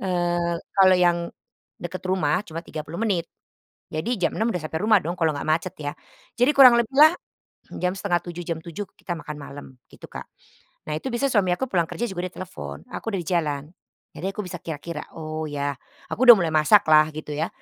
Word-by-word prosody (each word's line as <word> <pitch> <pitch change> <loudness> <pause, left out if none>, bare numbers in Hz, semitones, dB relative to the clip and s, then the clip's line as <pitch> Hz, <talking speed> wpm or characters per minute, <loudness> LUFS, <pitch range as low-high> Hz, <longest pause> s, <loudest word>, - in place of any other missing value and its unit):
Eee, 175 -2 0 0.2
kalau 185 -1 +7
yang 175 -1 +3 0.6
deket 175 +1 -6
rumah, 180 -3 +1
cuma 165 +1 -6
30 155 +2 -7
menit. 185 -7 0 0.7
Jadi 220 +11 -1
jam - - +2
6:00 225 +2 +1
udah - - 0
sampai 160 +1 -3
rumah 215 0 +5
dong, 170 - -2
kalau 160 -2 +2
nggak - - -5
macet 165 +3 0
ya. 145 -1 -4 0.5
Jadi 245 +4 +4
kurang 255 -3 +9
lebih 235 +3 -2
lah, 310 +3 +8 0.7
jam 180 0 +1
6:30, 175 -2 -2
jam 165 -2 -2
7:00 175 +4 -5
kita 175 - -6
makan 150 -2 -7
malam, 145 0 -9 0.3
gitu, - - -12
Kak. - - -8 0.6
Nah 150 - -2
itu 260 - -5
bisa 240 +4 +1
suami 205 -7 +2
aku 265 - -2
pulang 175 -5 +1
kerja 240 - -3
juga 180 -1 -4
dia 180 - -16
telepon, 185 0 -8
"Aku 225 - -5
udah 195 - 0
di 160 - -12
jalan." 150 -5 0 0.5
Jadi - - -6
aku 210 - -4
bisa 180 -2 -6
kira-kira, 160 -1 -6
"Oh, 155 0 -5
ya." 145 -2 -3 0.3
Aku 255 - 0
udah 245 - +12
mulai 170 -3 0
masak 155 +7 +6
lah, 155 0 +7
gitu 155 0 -7
ya, 160 - 0
175 Hz, 200 wpm, -24 LUFS, 155-195 Hz, 0.7 s, udah